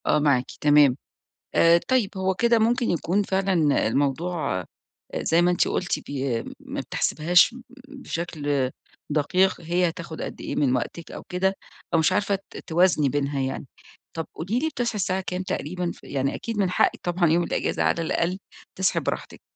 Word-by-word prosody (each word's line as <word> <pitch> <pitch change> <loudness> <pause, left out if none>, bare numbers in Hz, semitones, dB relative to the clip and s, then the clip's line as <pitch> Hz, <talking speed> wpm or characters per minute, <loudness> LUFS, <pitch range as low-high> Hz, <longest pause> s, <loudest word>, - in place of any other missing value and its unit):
آه - - +3
معاكي، 140 -4 +1
تمام، 145 -3 +5 0.6
آآ، 170 0 +6
طيب 250 -6 +2
هو 190 0 0
كده 235 +3 +3
ممكن 235 +2 +2
يكون 175 +4 +1
فعلًا 190 - +1
الموضوع 145 - 0
آآ، 90 - -9 0.6
زي 165 +1 +3
ما 175 +1 +4
أنتِ 175 - +2
قُلتِ 185 - -1
بي 135 -4 -2 0.2
ما - - -6
بتحسبيهاش 175 +8 +3 0.3
بشكل 155 - -2 0.4
دقيق 175 +6 +2
هي 175 +2 +1
هتاخد 170 -1 -7
قد - - -6
إيه - - -4
من 135 -3 +2
وقتِك 160 +6 -4
أو - - -8
كده، 190 +2 0 0.4
أو 165 - +5
مش 160 - +3
عارفة 200 +1 +1
ت - - -10
توازني 170 -4 +2
بينها 140 +1 -1
يعني، 135 +2 -3 0.5
طَب 165 -1 -3
قولي 195 +9 -2
لي 320 +4 0
بتصحى 245 -6 -2
الساعة 190 -1 0
كام 180 +1 -2
تقريبًا 180 -1 -3
ف - - -14
يعني 135 -1 -2
أكيد 230 -2 -5
من 195 -3 +2
حقِّك 180 - +2
طبعًا 175 0 +1
يوم 170 +2 +3
الإجازة - - -1
على 170 - +1
الأقل 170 +3 -1 0.4
تصحي 190 0 +1
براحتِك - - -4
175 Hz, 170 wpm, -25 LUFS, 145-190 Hz, 0.6 s, آآ